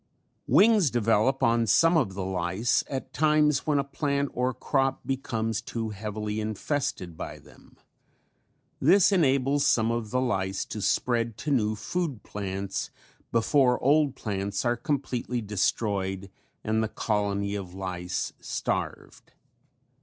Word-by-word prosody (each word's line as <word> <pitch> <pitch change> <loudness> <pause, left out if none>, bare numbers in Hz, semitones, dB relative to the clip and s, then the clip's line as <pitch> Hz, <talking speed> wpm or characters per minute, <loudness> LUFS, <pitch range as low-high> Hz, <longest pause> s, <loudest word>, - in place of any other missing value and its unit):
Wings 195 - +5
develop 115 +1 +2
on 115 0 +3
some 165 - +5
of 115 - +1
the 95 -1 -3
lice 95 +5 0
at 135 -1 -5
times 150 -2 +2
when 150 -2 +3
a 140 - +2
plant 140 0 -1
or 125 +1 0
crop 135 0 -1
becomes 115 -5 -2
too 115 -1 -4
heavily 105 +1 -4
infested 110 - -3
by - - -6
them. - - -19 1.0
This 185 +7 +5
enables 140 -5 +2
some 115 0 +3
of 115 -2 -2
the 125 - 0
lice 95 -6 -1
to 105 - -6
spread 115 +2 0
to 150 - -3
new 110 -5 +2
food 130 - -3
plants 100 -1 -4 0.4
before 125 +2 +3
old 145 0 +3
plants 100 0 -3
are 120 0 +2
completely 125 -4 -2
destroyed 100 -2 -1 0.3
and 110 +1 +1
the 110 - -1
colony 100 -2 -1
of 95 -3 -6
lice 90 -2 -3
starved. - - -4
115 Hz, 130 wpm, -27 LUFS, 100-140 Hz, 1.0 s, Wings